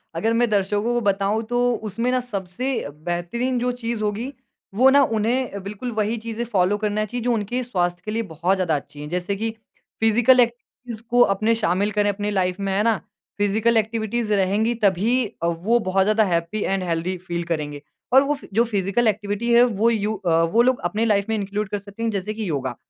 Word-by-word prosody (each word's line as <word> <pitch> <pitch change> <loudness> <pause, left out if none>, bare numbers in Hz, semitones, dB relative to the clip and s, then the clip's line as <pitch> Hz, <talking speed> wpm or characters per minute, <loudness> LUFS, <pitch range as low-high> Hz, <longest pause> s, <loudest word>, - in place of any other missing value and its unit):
अगर 220 +7 +1
मैं 235 0 +2
दर्शकों 205 0 +1
को 240 - +1
बताऊँ 200 +1 +1
तो 245 - 0 0.3
उसमें 230 +5 -1
ना 255 - +2
सबसे 240 +2 -3
अ, - - -6
बेहतरीन 175 - -2
जो 250 +1 0
चीज़ 235 -2 -4
होगी 215 +5 -2 0.4
वो 255 +5 +6
ना 280 +1 +6 0.2
उन्हें 230 -1 -1
बिल्कुल 210 +5 -5
वही 215 +3 -1
चीज़ें 230 0 -3
फॉलो 195 0 +2
करना 210 0 0
चाहिए 240 +3 -5
जो 245 0 +2
उनके 230 +3 -2
स्वास्थ्य 180 -6 -1
के 215 - -3
लिए 225 +1 -1
बहुत 175 +5 +1
ज़्यादा 175 -4 +1
अच्छी 145 +1 -7
है। 150 - -6
जैसे 180 +3 -2
कि 225 +3 -2 0.5
फिजिकल 230 +3 +4
एक्टिविटीज़ 235 -1 -2
को 245 - +2 0.2
अपने 220 +3 +1
शामिल 205 -1 0
करें 205 0 +1
अपनी 205 +1 -2
लाइफ 185 -1 0
में 195 -1 -2
है 200 +2 +1
ना? 225 0 +3 0.4
फिजिकल 220 +3 +2
एक्टिविटीज़ 220 0 -1
रहेंगी 205 +4 +2
तभी 215 +6 +2 0.2
अ, - - +2
वो 180 +8 +1
बहुत 190 +1 +3
ज़्यादा 215 +2 +3
हैपी 170 +3 -1
एंड 195 -1 -1
हेल्थी 175 +1 -2
फील 175 -1 -5
है - - -2
करेंगे 145 -2 -5 0.3
और 265 - +8
वो 285 +1 0
फ 280 - -13
जो 230 +4 +4
फिजिकल 205 +1 0
एक्टिविटी 210 +2 -1
है 240 +1 +7
वो 230 -2 +2
यू 215 -2 0
अ, 170 -4 +1
वो 205 +8 +3
लोग 255 +1 +2
अपनी 220 +2 0
लाइफ 200 -3 +2
में 220 - +1
इंक्लूड 205 0 -3
कर 205 - -2
सकते 200 +3 -9
हैं 230 - +1
जैसे 205 +1 -3
कि 215 -4 -4
योगा। 130 -4 -2
210 Hz, 210 wpm, -22 LUFS, 190-230 Hz, 0.5 s, और